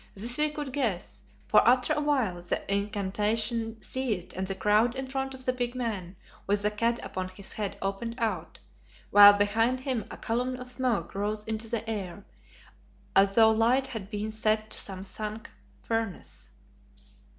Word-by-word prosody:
This 235 +7 +1
we 305 0 +4
could 295 -3 -6
guess, 230 -11 -2 0.3
for - - +6
after 250 0 +4
awhile 265 -12 0
the 175 - -3
incantation 215 +3 -1
ceased 225 -9 -2
and 190 +1 -3
the 195 - -2
crowd 215 +5 +2
in 265 0 -4
front 270 0 -3
of 260 0 -2
the 255 - +1
big 245 0 -3
man 205 -7 -4 0.3
with 205 +1 +1
the 210 - +2
cat 230 +3 0
upon 185 0 -4
his 190 +1 -5
head 205 -2 -3
opened 200 +4 -3
out, 230 -3 -2 0.5
while 205 0 +10
behind 225 +5 +1
him 255 -6 -2
a - - -8
column 250 +3 -1
of 250 0 -7
smoke 250 -3 -1
rose 210 +2 -2
into 220 +1 -2
the 225 -1 -3
air, 200 -3 -5 0.9
as 195 0 +4
though 220 -1 +7
light 235 +4 +3
had 215 -6 -6
been 215 0 -3
set 215 0 0
to - - -3
some 190 -1 -4
sunk 215 +2 -5 0.3
furnace. 225 -5 -4
220 Hz, 165 wpm, -28 LUFS, 205-245 Hz, 0.9 s, while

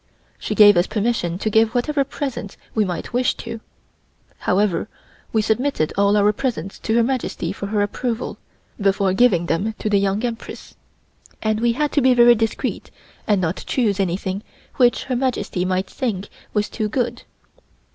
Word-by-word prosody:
She 210 - -3
gave 205 -3 +8
us 175 - +3
permission 210 -6 -1
to 215 - -1
give 220 +2 +3
whatever 280 +3 +1
presents 265 -6 -5 0.2
we 215 - +2
might 180 +4 -4
wish 250 +1 +1
to. 230 -1 -7 0.8
However, 200 +2 +1 0.4
we 220 -1 +2
submitted 225 - 0
all 200 +1 +3
our 205 +1 +4
presents 240 -5 -3
to 220 - -1
Her 235 - +4
Majesty 260 +1 -2
for 200 - -5
her 205 0 +1
approval, 230 +3 -3 0.4
before 195 -1 +2
giving 190 -6 +3
them 195 +7 -1
to 215 - -3
the 200 - +4
Young 200 +4 0
Empress, 230 -1 -7 0.7
and 215 -1 +1
we 235 0 +2
had 295 +4 0
to 290 - +2
be 255 -1 +4
very 240 0 +7
discreet 225 -1 -2 0.4
and 205 -2 +3
not 180 0 -2
choose 210 -6 +1
anything 190 +1 -1 0.4
which 245 -2 +3
Her 255 - -2
Majesty 240 -8 -1
might 185 +1 0
think 205 -6 -3 0.2
was 210 -1 0
too 215 -2 -3
good. 245 +2 -1
215 Hz, 165 wpm, -21 LUFS, 200-240 Hz, 0.8 s, gave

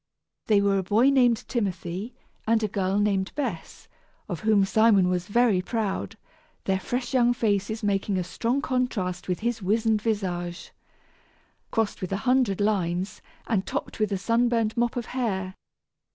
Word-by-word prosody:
They 210 -2 +4
were 200 -1 +2
a - - -2
boy 220 +8 +4
named 245 -4 +3
Timothy 195 -1 -3 0.3
and 225 0 +3
a - - +2
girl 195 -1 -1
named 200 -2 +1
Bess, 235 - -5 0.4
of 175 -5 -4
whom 215 -2 +3
Simon 205 -3 +4
was 180 0 -1
very 220 -3 +3
proud, 215 0 -3 0.5
their 190 -1 0
fresh 245 +6 -3
young 245 -1 +4
faces 215 0 -1
making 200 -1 0
a 180 - 0
strong 240 +9 -1
contrast 200 -8 -1
with 180 +1 -2
his 235 0 -1
wizened 215 +2 +1
visage, 180 -6 -3 1.0
crossed 225 -2 -1
with 185 - -4
a 195 - 0
hundred 250 -6 +2
lines, 190 -3 -1 0.2
and 200 -5 -1
topped - - -4
with 215 -1 +1
a 195 - 0
sunburned 230 +1 +1
mop 240 -1 0
of 240 -2 -3
hair. 190 -7 -2
210 Hz, 155 wpm, -26 LUFS, 190-235 Hz, 1.0 s, They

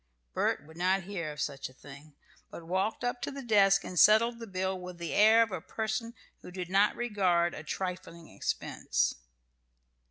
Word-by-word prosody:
Bert 145 - 0
would 160 +2 -15
not 190 +2 +1
hear 175 -5 -4
of 150 - -10
such 140 -3 -3
a - - -18
thing, 145 +2 -14 0.3
but 170 - -10
walked 190 +7 -1
up 245 0 -2
to - - -3
the 275 -1 -7
desk 200 -4 +4
and 180 - -3
settled 230 +3 +5
the 230 - -8
bill 190 -1 -2
with 180 -1 -8
the 170 -2 -5
air 220 +2 +6
of 225 - -5
a 185 - -4
person 220 +2 -4 0.3
who - - -10
did 180 -1 -6
not 200 +2 +3
regard 185 -7 +1
a - - -7
trifling 180 -3 -5
expense. - - -1
190 Hz, 185 wpm, -30 LUFS, 170-215 Hz, 0.3 s, air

